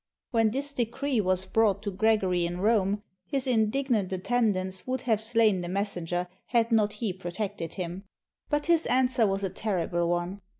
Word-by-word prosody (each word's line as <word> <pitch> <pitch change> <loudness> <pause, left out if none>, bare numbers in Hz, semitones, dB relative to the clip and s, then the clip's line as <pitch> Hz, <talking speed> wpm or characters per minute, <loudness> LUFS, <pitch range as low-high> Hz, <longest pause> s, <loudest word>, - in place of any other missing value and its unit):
When 225 -3 +3
this 280 +5 -3
decree 250 +1 0
was 185 -1 0
brought 205 0 +2
to 205 - -2
Gregory 190 -3 +2
in 175 +1 -5
Rome, 205 -1 +2 0.2
his 275 -3 -1
indignant 230 -3 +1
attendants 190 -2 0
would 255 0 -1
have 220 -3 +1
slain 220 -4 +3
the 175 - -5
messenger 180 -3 -2 0.2
had 235 -1 +2
not 215 -2 +3
he 210 -2 -2
protected 185 -1 -5
him. 185 +1 -5 0.4
But 295 -1 0
his 335 -1 +3
answer 250 -3 +3
was 195 0 -1
a 190 - 0
terrible 175 -4 -1
one. 175 +3 -2
210 Hz, 165 wpm, -28 LUFS, 185-235 Hz, 0.4 s, When